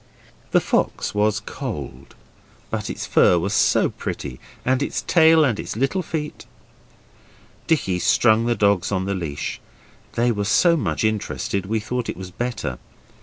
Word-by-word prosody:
The - - +4
fox - - -1
was 105 0 +2
cold, 65 +2 -7 0.6
but - - -3
its - - -4
fur 90 - +4
was 100 +4 -1
so - - +3
pretty, 65 -3 -6 0.3
and 130 +1 +2
its - - -2
tail 160 -2 +5
and 120 -6 0
its - - -5
little 135 - 0
feet. 155 -3 -5 1.2
Dicky 95 - +1
strung 115 +4 +3
the 120 - +2
dogs 100 -4 +2
on 95 -2 0
the 100 - -1
leash; 80 -6 -4 0.5
they 120 +1 +2
were 105 -2 -2
so 170 - +4
much 95 - -1
interested 100 -2 -1
we 110 +2 0
thought 120 +3 -3
it - - -4
was 95 0 -8
better. 105 - -4
110 Hz, 155 wpm, -22 LUFS, 95-125 Hz, 1.2 s, tail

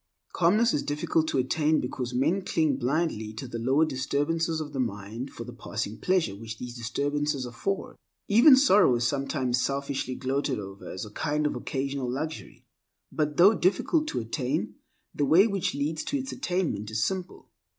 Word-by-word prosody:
Calmness 210 +7 +3
is 145 - +1
difficult 155 +2 0
to - - 0
attain 150 +4 +2
because 125 0 -4
men 150 +10 +1
cling 155 -6 +1
blindly 125 -5 -1
to 120 +5 -6
the 115 -1 -5
lower 135 +7 +3
disturbances 155 +4 -1
of 150 -2 -6
the 135 - -3
mind 115 +2 -3
for - - -8
the - - -9
passing 105 - -5
pleasure 180 - +1
which 110 +1 -8
these 120 0 -7
disturbances 145 +4 -1
afford. 125 +12 -4 0.3
Even 240 +7 +8
sorrow 205 - +5
is 120 0 0
sometimes 135 -2 0
selfishly 140 -2 -2
gloated 135 +1 -1
over 100 -1 -8
as 95 - -5
a 105 - -11
kind 150 +6 -1
of 150 - 0
occasional 135 -1 -3
luxury. 155 +5 -5 0.5
But 150 -1 -1
though 195 +5 +7
difficult 205 - +1
to - - -2
attain, 115 -2 -2 0.4
the - - -1
way 165 +8 +6
which 200 -8 -1
leads 150 +3 -2
to 285 - -1
its 265 -1 -4
attainment 175 - -2
is 110 0 0
simple. 185 +6 -4
140 Hz, 170 wpm, -27 LUFS, 125-165 Hz, 0.5 s, Even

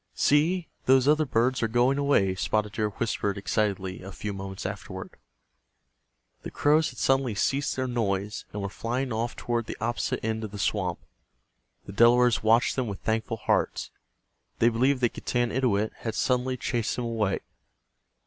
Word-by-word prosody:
"See, 165 +4 +2 0.2
those 130 0 +5
other 155 0 +4
birds 125 +2 +1
are 115 - +2
going 120 +5 +2
away," 140 -10 +3
Spotted 105 +3 -1
Deer 105 0 -1
whispered, 105 -1 -2
excitedly, 100 -2 -1
a 95 +1 -8
few 105 +1 -5
moments 95 -1 -6
afterward. - - -6 1.3
The - - -6
crows 155 +2 +3
had 125 - -13
suddenly 135 -4 +1
ceased 140 +7 0
their 130 - -1
noise, 105 -5 -2
and 105 -1 -4
were 100 - -2
flying 120 +4 -3
off 115 +2 -2
toward 120 -1 -2
the - - -6
opposite 115 0 -2
end 110 0 -1
of 110 - -4
the 105 - -8
swamp. 95 -3 -1 0.9
The - - -9
Delawares 120 0 +5
watched 115 +3 +3
them 130 -3 -1
with 100 -2 -6
thankful 115 0 -1
hearts. - - 0 0.7
They 115 - +4
believed 130 +3 +1
that 120 - +2
Getanittowit 120 -3 0
had 115 -2 -4
suddenly 125 +1 0
chased 120 -1 -1
them 125 - -3
away. 110 -4 -1
115 Hz, 160 wpm, -27 LUFS, 105-130 Hz, 1.3 s, those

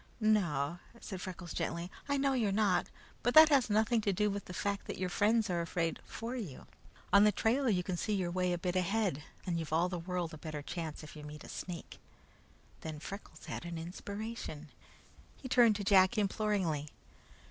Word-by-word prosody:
"No," 175 -8 +2 0.2
said 190 -5 -6
Freckles 180 -2 -6
gently, 170 +1 -3 0.2
"I 285 - +2
know 275 0 +2
you're 225 -6 +1
not; 200 -2 +2 0.3
but 245 - +1
that 315 0 +11
has 270 -6 +4
nothing 220 +2 +3
to 205 - +1
do 210 +2 +1
with 200 -1 -4
the - - -8
fact 200 +2 -2
that - - -4
your 185 0 -1
friends 220 +3 +3
are 175 -3 0
afraid 170 -1 -1
for 235 +2 -5
you. 195 - -6 0.5
On 200 0 +8
the 210 - +6
trail 240 +6 +2
you 180 -4 +2
can 180 -1 -2
see 215 - -1
your 180 -3 -1
way 180 0 +1
a 175 - +1
bit 180 +1 -2
ahead, 185 -4 +1 0.2
and 170 -3 -1
you've 160 -2 -5
all 170 +3 +3
the 180 -1 -3
world 175 -1 -3
a 155 - -8
better 155 -2 -5
chance 160 -1 -5
if 155 - -10
you 150 - -9
meet 150 0 -9
a - - -11
snake." 175 -2 -7 0.8
Then 155 -1 -6
Freckles 200 +6 -9
had - - -5
an 170 -1 -5
inspiration. 185 -2 -6 0.7
He 260 - -7
turned 240 -4 +5
to 205 - -3
Jack 190 +1 +5
imploringly. 195 -7 0
185 Hz, 200 wpm, -33 LUFS, 170-215 Hz, 0.8 s, that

